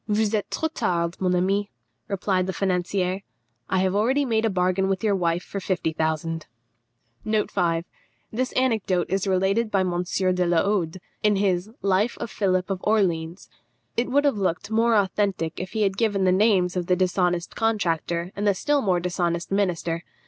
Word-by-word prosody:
"Vous 210 0 +1
êtes 210 -2 -1
trop 320 - -1
tard, 170 - 0
mon 180 -1 +1
ami," 195 +3 +1 0.4
replied 190 -2 0
the 190 - -2
financier; 185 +1 -1 0.5
"I 190 - +2
have 190 0 +1
already 260 +7 +2
made 225 -2 +1
a - - +2
bargain 185 0 +1
with 195 +2 -1
your 210 -2 +2
wife 170 -1 0
for 200 - -5
fifty 180 -4 -1
thousand." 160 0 -2 0.8
This 210 +4 -2
anecdote 215 -9 +1
is 195 +1 0
related 195 +4 +1
by 195 -2 +2
M. 180 -1 0
de 180 0 0
la 170 -1 +3
Hode, 185 -4 -1 0.2
in 210 -1 +3
his 195 -1 0
Life 200 +4 +1
of 235 - -5
Philippe 185 -1 0
of 185 - -6
Orleans. 175 -5 0 0.5
It 235 - 0
would 285 +3 +3
have 275 -8 +2
looked 190 +2 -1
more 230 +1 +3
authentic 195 -4 0
if 185 - -6
he 220 -1 +1
had 195 -1 0
given 205 -4 +1
the 185 - +4
names 185 -2 +3
of 180 -1 -2
the 180 - +3
dishonest 180 -1 0
contractor 175 -5 0
and 205 +1 -1
the 200 - +3
still 290 +8 +1
more 185 -6 +2
dishonest 175 -1 -2
minister. 175 -4 0
190 Hz, 175 wpm, -24 LUFS, 180-210 Hz, 0.8 s, the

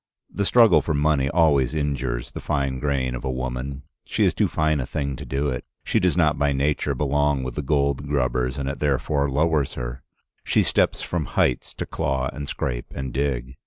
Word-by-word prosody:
The 100 - 0
struggle 115 -3 +6
for 80 - -1
money 70 -2 +2
always 75 -4 +3
injures 65 -5 -2
the - - -7
fine 70 -2 -1
grain 65 -3 0
of 60 - -5
a 65 - -2
woman; 65 +2 -4 0.2
she - - +1
is - - +3
too - - +2
fine 80 -1 +1
a 65 - -1
thing 70 -2 -2
to - - -8
do 70 +2 0
it; 60 -2 -3 0.2
she - - +1
does 90 -3 +1
not 80 -4 +3
by 70 0 +2
nature 70 0 0
belong 70 0 +1
with 65 -1 -4
the 75 - -3
gold 70 -1 0
grubbers, 65 -2 0
and 70 -1 -3
it 70 - -3
therefore 70 0 +1
lowers 75 0 +1
her; - - -5 0.4
she - - +2
steps - - +1
from 85 -4 -2
heights 65 - +1
to - - -4
claw 65 -1 -1
and 70 +1 -6
scrape - - -3
and 65 -2 -4
dig. 65 -2 -2
70 Hz, 200 wpm, -24 LUFS, 65-75 Hz, 0.4 s, struggle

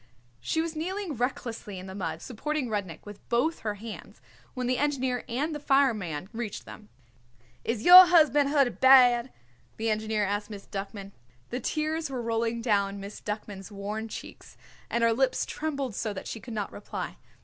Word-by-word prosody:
She 125 - 0
was 330 -1 -4
kneeling 370 +2 -3
recklessly 235 -5 -3
in 185 - -8
the 190 - -8
mud 165 -4 -4
supporting 270 +2 -3
Rudnik 195 -7 -4
with 205 -1 -10
both 290 +8 +1
her 210 -2 -3
hands 220 +2 -9 0.4
when 255 -1 -2
the 250 0 0
engineer 260 -4 0
and 285 +7 -1
the 295 - -4
fireman 220 - +1
reached 225 -3 -5
them. 215 -1 -12 0.7
"Is 230 -1 -2
your 365 +1 +12
husband 300 -5 +5
hurted 280 -4 +2
bad?" 255 -2 +6 0.5
the 225 0 0
engineer 215 -1 0
asked 205 +2 -2
Miss 205 -2 -9
Duckman. 195 0 -6 0.4
The 245 - -2
tears 310 +4 -2
were 260 -2 -4
rolling 230 0 -1
down 200 -3 +1
Miss 200 +1 -8
Duckman's 210 -2 -6
worn 210 +2 -4
cheeks, - - -10 0.3
and 235 - 0
her 230 0 +4
lips 260 +2 +1
trembled 280 -6 -3
so 215 +1 -3
that 190 - -7
she 225 - -5
could 235 0 -8
not 205 -2 -3
reply. 205 - -6
230 Hz, 170 wpm, -28 LUFS, 205-275 Hz, 0.7 s, your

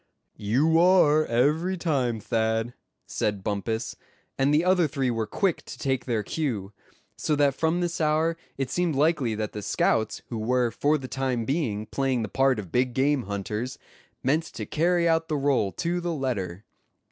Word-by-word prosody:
"You 140 +11 +3
are, 165 -4 +5
every 150 +10 +1
time, 135 -9 0
Thad," 110 +2 -1 0.3
said 105 -2 -2
Bumpus, 105 +2 -2 0.4
and 135 +1 +2
the 155 +4 +3
other 180 -3 +4
three 135 -3 -1
were 115 -2 -2
quick 185 - 0
to - - -9
take 130 -2 -1
their 115 -4 -1
cue; 105 -9 -3 0.4
so 150 - 0
that 145 -1 +3
from 160 +5 0
this 175 -1 -2
hour 155 +2 +2 0.2
it 135 -1 -2
seemed 175 -4 0
likely 140 -6 +2
that 105 -1 -3
the 105 - -6
scouts 110 +2 0
who 115 - -4
were 120 +1 +1
for 150 +5 +1
the 135 -3 -7
time 130 -3 -2
being 115 -7 -1
playing 130 +1 -1
the 105 - -4
part 135 +2 +2
of 95 -6 -7
big 125 0 +1
game 135 -1 +2
hunters, 105 +4 -4 0.5
meant 155 +5 +2
to - - -7
carry 170 +2 +2
out 165 0 +2
the 155 - -1
rôle 135 -8 +1
to 175 +1 -1
the 175 -1 -2
letter. 105 - -3
135 Hz, 175 wpm, -26 LUFS, 115-160 Hz, 0.5 s, are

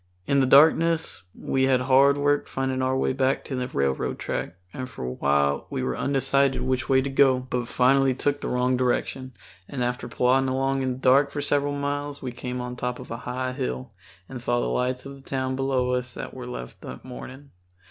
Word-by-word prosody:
In 140 +5 +2
the 130 - +3
darkness 160 - +4
we 130 0 +1
had 130 -1 +3
hard 135 +2 +5
work 145 0 +1
finding 130 0 -2
our 130 0 +1
way 130 - +1
back 135 0 0
to 135 - -4
the 125 0 -2
railroad 70 - -1
track, 85 - -4 0.2
and 130 -1 -5
for 90 - -7
a 65 - -3
while 70 +2 +1
were 65 -1 -2
undecided 140 - +1
which 130 0 -1
way 130 -1 +4
to 140 - -2
go, 135 -1 +4
but 125 -1 -3
finally 130 +1 +3
took 145 +2 -1
the - - -3
wrong 125 +1 +1
direction, 130 +1 -1 0.4
and 130 -3 -3
after 125 0 -2
plodding 130 +1 +2
along 135 +1 0
in 130 -1 0
the - - -8
dark 135 +2 +4
for 145 - -5
several 145 0 +1
miles 145 0 -3
we 130 - -5
came 125 +1 -5
on 125 0 -5
top 125 0 -3
a - - -2
high 125 +2 -4
hill 65 - -4 0.4
and 125 -2 -7
saw 120 0 +1
the - - -1
lights 125 +1 -1
of 140 - -7
the 135 - -13
town 130 -1 -2
below 130 -2 0
us 125 -1 -2
that - - -6
we 125 -1 -8
left 60 - -8
that 65 - -9
morning. 130 +2 -10
130 Hz, 210 wpm, -25 LUFS, 125-135 Hz, 0.4 s, hard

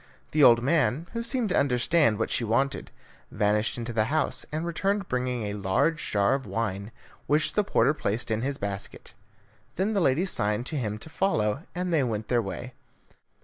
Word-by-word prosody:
The 150 -1 +3
old 120 -2 +7
man, 155 +1 +1
who 230 - -2
seemed 235 -1 -1
to - - 0
understand 140 -1 +2
what 110 - -2
she - - 0
wanted, 120 +5 0 0.4
vanished 105 +3 0
into 120 0 -4
the 110 -1 +2
house, 155 +5 -1
and 155 +2 -2
returned 195 +4 -1
bringing 125 -2 -2
a 105 -1 -3
large 105 +11 0
jar 100 +3 +2
of 135 -1 -2
wine, 105 -2 -3 0.4
which 150 +2 +2
the 210 - +2
porter 150 -6 +2
placed 115 -5 -2
in 110 0 0
his 135 +2 -2
basket. 100 -1 -6 0.6
Then 200 +4 0
the 200 - +1
lady 160 +4 +2
signed 105 - 0
to 155 - -2
him 110 -6 -2
to 135 - -11
follow, 140 - 0
and 180 -1 -2
they 155 - +3
went 110 -4 -2
their 120 -1 +3
way. 120 +5 -6
125 Hz, 190 wpm, -27 LUFS, 110-160 Hz, 0.6 s, old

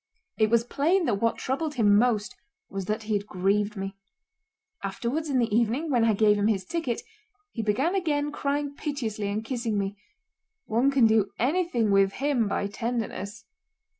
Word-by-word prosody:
It 215 -1 +4
was 230 0 +3
plain 325 +9 +1
that 205 -7 0
what 230 0 +1
troubled 295 +4 -2
him 210 -4 +4
most 215 -2 +2 0.4
was 195 -1 -4
that 215 +3 -2
he 215 0 -2
had 205 0 -1
grieved 200 +3 0
me. 195 0 -5 0.9
Afterwards 245 +10 -2
in 270 - +1
the 230 -4 +1
evening 240 +8 +1
when 240 -3 +3
I 220 -2 +3
gave 210 0 +4
him 205 - +2
his 195 -4 0
ticket, 325 - -2 0.5
he 230 - -3
again 225 - +1
began 295 -6 0
crying 285 0 -2
piteously 230 -9 -3
and 210 +2 -2
kissing 235 -4 -2
me. 200 0 -2 0.7
One 235 +5 +2
can 270 -4 +4
do 220 -3 +3
anything 260 - +1
with 195 0 +4
him 270 -5 +1
by 200 - -1
tenderness. 220 0 -4
225 Hz, 170 wpm, -27 LUFS, 205-275 Hz, 0.9 s, It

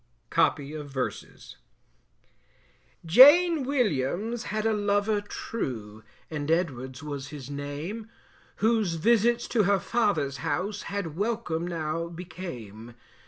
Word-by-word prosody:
Copy 145 -3 +1
of 150 -2 -7
Verses. 130 -2 -5 1.5
Jane 290 - +8
Williams 225 - -1
had 215 0 -2
a 225 - +3
lover 205 0 +1
true 110 - -5 0.3
And 150 -1 -3
Edwards 140 -5 -1
was 140 -2 -5
his 145 -2 -8
name, 150 +11 -5 0.5
Whose 215 -5 +1
visits 235 +6 +3
to 230 - +3
her 200 0 +3
father's 190 - 0
house, 195 +8 -2
Had 195 -6 -3
welcome 200 -5 -2
now 165 -1 -2
became. 125 - -8
175 Hz, 110 wpm, -27 LUFS, 145-215 Hz, 1.5 s, Jane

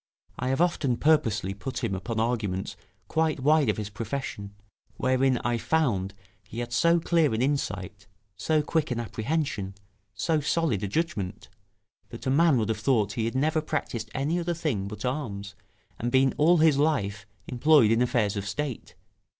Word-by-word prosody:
I 125 - -2
have 135 +4 +1
often 150 -8 +1
purposely 110 - +2
put 125 +5 -6
him 110 -4 0
upon 110 +4 -3
arguments 105 -5 -1 0.3
quite 160 -2 0
wide 150 -1 +3
of 105 - 0
his 105 -1 -5
profession, 105 -2 -5 0.4
wherein 130 0 +2
I 120 -1 0
found 110 -12 0 0.3
he 115 - -10
had 120 0 -4
so 170 +7 +4
clear 165 -6 +2
an 110 - -1
insight, 105 -8 -2 0.3
so 150 - +1
quick 155 +1 0
an 125 -2 -2
apprehension, 115 -4 -2 0.4
so 160 -2 +1
solid 150 - 0
a 100 - -2
judgment, 105 - -3 0.6
that 115 - -9
a 130 - +1
man 155 0 +4
would 110 -2 0
have 110 -1 -1
thought 110 -3 +2
he 110 0 -1
had 115 - -3
never 155 +4 +1
practised 120 -8 -3
any 150 +6 0
other 170 0 -2
thing 135 - -2
but 105 +2 -6
arms, 105 -7 -4 0.5
and 120 +1 -2
been 130 +1 +4
all 170 +4 +4
his 155 -3 +4
life 100 -10 0 0.2
employed 130 -2 +4
in 115 +1 +3
affairs 115 -4 +1
of 100 0 -4
State. 130 +4 -4
125 Hz, 170 wpm, -27 LUFS, 105-155 Hz, 0.6 s, so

